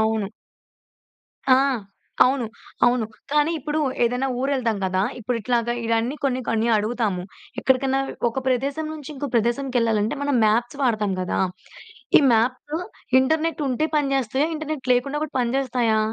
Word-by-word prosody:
అవును. 220 -2 +1 1.2
ఆ! 260 - +8 0.7
అవును. 255 -2 +1 0.4
అవును. 240 -1 +2 0.3
కానీ 300 +1 +3
ఇప్పుడు 300 +1 -2 0.3
ఏదైనా 250 +3 0
ఊరెళ్తాం 255 -6 0
కదా! 185 0 +1 0.2
ఇప్పుడు 245 +1 -2
ఇట్లాగ 240 +1 0 0.2
ఇయన్నీ 230 +4 0
కొన్ని, 260 -2 +1
కొన్ని 225 +1 +1
అడుగుతాము. 215 -3 -1 0.4
ఎక్కడికన్నా 265 +1 +2 0.3
ఒక 250 +3 -3
ప్రదేశం 275 +5 0
నుంచి 300 -4 -8
ఇంకో 285 0 -4
ప్రదేశంకెళ్ళాలంటే, 235 -1 +1
మనం 285 -1 +1
మాప్స్ 240 +5 +1
వాడతాం 215 -6 +1
కదా! 180 - -1 0.8
ఈ - - +3
మాప్సు 255 +7 0 0.4
ఇంటర్నెట్ 315 +3 0
ఉంటే 265 +5 +1
పని 290 -2 +1
జేస్తాయా? 270 +4 +1
ఇంటర్నెట్ 305 -4 -4
లేకుండా 275 +4 -1
కూడా 300 - -10
పనిజేస్తాయా? 245 -3 +1
250 Hz, 130 wpm, -23 LUFS, 225-275 Hz, 1.2 s, ఆ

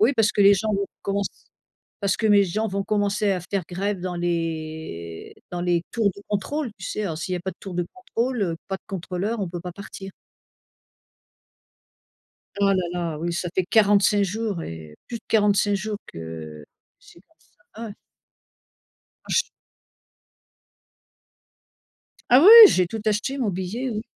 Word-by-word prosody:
oui, 230 +6 +5
parce 220 -1 +3
que - - 0
les 200 0 +7
gens 215 +2 -1
vont 200 0 -1 0.2
commence 200 0 -1 0.7
parce 200 -2 +1
que 220 - 0
mes 205 -1 +6
gens 215 +5 -1
vont 195 0 -2
commencer 205 0 0
à 185 - -1
faire 190 +2 -3
grève 195 +2 -2
dans 180 -1 -4
les 160 - -4 0.2
dans 175 - -3
les 175 -1 +1
tours 220 -4 +2
de 200 - -12
contrôle, 230 +7 -2
tu 185 - -8
sais, 215 - -3
alors, 165 -6 -3
s'il 185 +2 -3
y - - 0
a - - -5
pas 190 +2 -4
de - - -29
tour 190 -3 -8
de 175 -1 -1
contrôle, 250 - -2
heu, 165 -3 -1
pas 195 - -2
de - - -25
contrôleur, 195 +4 -3
on 190 - -2
peut 175 0 -6
pas 180 0 -7
partir. 195 0 -9 2.5
Oh 200 - +3
là - - +2 0.2
là, 170 -3 -3
oui, 170 +2 -2
ça 175 +1 -2
fait 185 - +1
45 205 0 +4
jours 205 -3 -3
et 80 -2 -9
plus 235 - -5
de - - -28
45 205 -1 +3
jours 210 +2 -4
que 80 -2 -8 0.3
c'est 170 - -18
comme 325 - -33 0.4
ça, 230 - -6
ouais. - - -8 1.3
Oh, - - -19
je - - -1
s - - +4 2.9
Ah 255 - +9
oui, - - +9 0.2
j'ai 180 -1 +2
tout 220 +4 -5
acheté, 215 +6 0
mon 225 -6 0
billet, 190 +8 -3
oui. 215 -1 -3
195 Hz, 175 wpm, -24 LUFS, 175-210 Hz, 2.9 s, Ah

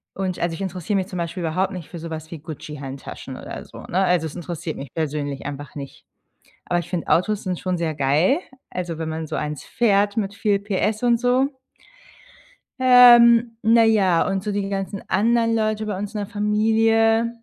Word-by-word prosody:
Und 185 -2 -2
also 170 -1 -1
ich 165 - -7
interessiere 190 +1 -2
mich 190 -1 -1
zum 185 - -7
Beispiel 170 +1 -4
überhaupt 185 +4 0
nicht 175 -5 -8
für 175 - -8
so 165 0 -7
was 160 0 -6
wie 165 - -7
Gucci-Handtaschen 145 -3 -8
oder - - -8
so, - - -12
ne? 185 - -1
Also, 180 -3 +2
es 155 - -10
interessiert 170 -1 -5
mich 135 -2 -9
persönlich 145 -3 -3
einfach 145 -1 -7
nicht. 140 -2 -9 0.6
Aber 175 0 0
ich 170 - -7
finde, 175 -3 -3
Autos 205 +4 +1
sind 180 -3 -3
schon 185 -2 -2
sehr 165 -2 -1
geil, 150 - +2 0.3
also 175 -3 -4
wenn 160 0 -4
man 160 0 -4
so 155 - -4
einen 150 -1 -3
fährt, 205 - +1
mit 200 -2 -1
viel 200 -1 +1
Pferdestärke 210 +3 -1
und 235 -1 +3
so. 255 +3 +2 1.3
Ähm, 240 -2 +7
na 225 +1 +5
ja, 195 -6 +3
und 195 -1 -1
so 210 - -3
die 200 -1 -2
ganzen 195 0 -4
anderen 230 +3 +2
Leute 215 -1 0
bei 205 -3 -3
uns 205 +2 -5
in 210 - -2
der 205 - -3
Familie, 225 +2 +2
190 Hz, 195 wpm, -22 LUFS, 165-220 Hz, 1.3 s, Ähm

